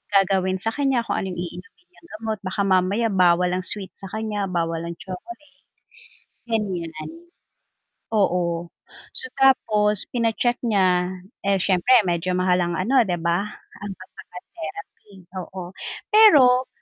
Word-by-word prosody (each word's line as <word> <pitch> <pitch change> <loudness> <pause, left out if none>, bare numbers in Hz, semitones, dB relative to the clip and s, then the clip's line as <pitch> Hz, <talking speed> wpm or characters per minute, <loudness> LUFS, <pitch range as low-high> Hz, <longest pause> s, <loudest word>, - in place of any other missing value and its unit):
gagawin 190 -1 +3
sa 225 - 0
kanya 270 -2 +1
kung - - -2
ano 190 - -3
yung 180 -2 -5
iinumin 180 - -11
niyang 340 -1 -21
gamot 220 -2 -3
baka 190 +1 -3
mamaya 195 +4 +2
bawal 180 -1 +3
ang 185 +1 -1
sweet 200 -2 -4
sa 195 - -7
kanya 210 0 -3
bawal 165 -2 -1
ang 170 +1 -5
chocolate. 295 - -9 1.0
Ganyan, 180 -9 -3 1.0
oo 175 -5 +1 0.5
so 475 - 0 0.2
tapos 210 -6 +3
pina-check 240 +1 0
niya 185 -6 +2 0.4
eh, 200 - +4
siyempre 195 +5 +4
medyo 180 0 -1
mahal 180 0 +2
ang 175 -1 -1
ano 245 +9 +3
'di 175 - 0
ba 170 +2 +2 0.4
ang 205 0 -5
pag 185 - -14
papa-therapy 215 - -10 0.2
oo, 180 0 -8 0.4
pero 270 - +7
195 Hz, 135 wpm, -23 LUFS, 180-225 Hz, 1.0 s, pero